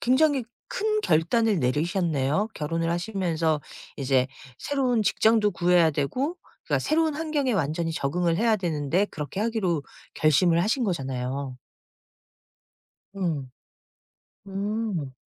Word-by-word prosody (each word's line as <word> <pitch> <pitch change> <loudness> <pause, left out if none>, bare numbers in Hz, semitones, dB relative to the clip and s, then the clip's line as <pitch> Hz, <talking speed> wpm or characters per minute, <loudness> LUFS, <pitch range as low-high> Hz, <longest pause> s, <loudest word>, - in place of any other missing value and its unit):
굉장히 270 +1 +3 0.3
큰 430 +1 0
결단을 210 - +2
내리셨네요. 155 - 0
결혼을 165 +2 -1
하시면서 170 -4 0 0.4
이제 130 -2 +2 0.3
새로운 255 -5 +1
직장도 215 +1 +3
구해야 175 -1 +4
되고 250 - -1 0.3
그러니까 - - 0
새로운 315 -1 +1
환경에 300 -4 0
완전히 165 -2 -1
적응을 165 +4 0
해야 225 +2 +3
되는데 170 +1 0
그렇게 150 +3 -5
하기로 205 -9 0 0.3
결심을 165 +3 +3
하신 240 +6 +1
거잖아요. 135 -5 -3 1.6
음. 160 -9 -2 1.0
음. 195 -7 -3
175 Hz, 275 characters per minute, -26 LUFS, 155-225 Hz, 1.6 s, 구해야